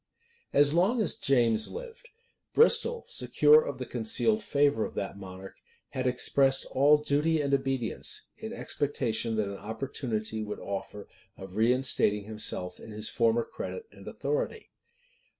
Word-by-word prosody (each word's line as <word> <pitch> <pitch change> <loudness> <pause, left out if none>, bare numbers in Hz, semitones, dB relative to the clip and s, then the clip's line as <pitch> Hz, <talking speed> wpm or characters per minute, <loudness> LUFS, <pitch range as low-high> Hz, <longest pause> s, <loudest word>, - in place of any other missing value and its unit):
As 145 +1 +4
long 190 +9 +2
as 210 - +1
James 115 -5 +2
lived, 485 0 -10 0.5
Bristol, 470 0 +4
secure 455 +1 +4
of - - -5
the - - -5
concealed 225 -1 +1
favor 145 - +1
of - - -6
that 100 - -4
monarch, 95 -1 -10 0.3
had 130 -1 -3
expressed 135 +2 +2
all 145 +3 +5
duty 150 +2 0
and 140 -1 -1
obedience; 135 -3 -1
in - - -6
expectation 115 -5 -2
that 110 -2 0
an 100 0 -6
opportunity 110 0 -4
would 105 -1 -6
offer 100 +1 -6 0.3
of 95 0 -10
reinstating 115 -3 +2
himself 100 -4 -4
in - - -12
his 105 0 -2
former 115 0 +1
credit 455 - -7
and - - -15
authority. 455 -1 -3
130 Hz, 140 wpm, -28 LUFS, 110-160 Hz, 0.5 s, all